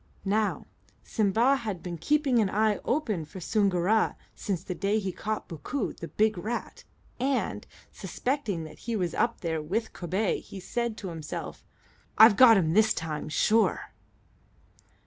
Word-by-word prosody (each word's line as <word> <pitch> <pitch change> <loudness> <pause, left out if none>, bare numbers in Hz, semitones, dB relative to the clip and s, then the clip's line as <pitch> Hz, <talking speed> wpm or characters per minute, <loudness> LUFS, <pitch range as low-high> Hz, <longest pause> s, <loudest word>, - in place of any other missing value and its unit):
Now, 210 +2 0 0.4
Simba 225 +6 +2
had 210 -9 -5
been 175 -2 -5
keeping 290 - +2
an 210 -3 +2
eye 210 +1 +1
open 225 - -1
for 170 +5 -10
Soongoora 200 +2 +1 0.2
since 185 -5 -3
the 190 - -4
day 200 +4 0
he 195 -3 -2
caught 215 +3 -4
Bookoo, 195 - -4
the 165 - -8
big 215 -1 +1
rat, 225 +6 -5 0.4
and, 265 +1 -1 0.2
suspecting 235 - -3
that 155 - -11
he 235 -1 -3
was 180 -5 -1
up 235 0 0
there 160 -2 -2
with 210 +9 -2
Kobay, 185 +4 -1
he 195 - -10
said 235 +3 -3
to 190 - -6
himself, 160 -3 -6 0.5
"I've 220 -1 +9
got 230 -1 +8
him 160 -4 +1
this 220 +2 +4
time, 155 -2 -4
sure." 220 +8 +1
210 Hz, 150 wpm, -28 LUFS, 175-225 Hz, 0.5 s, I've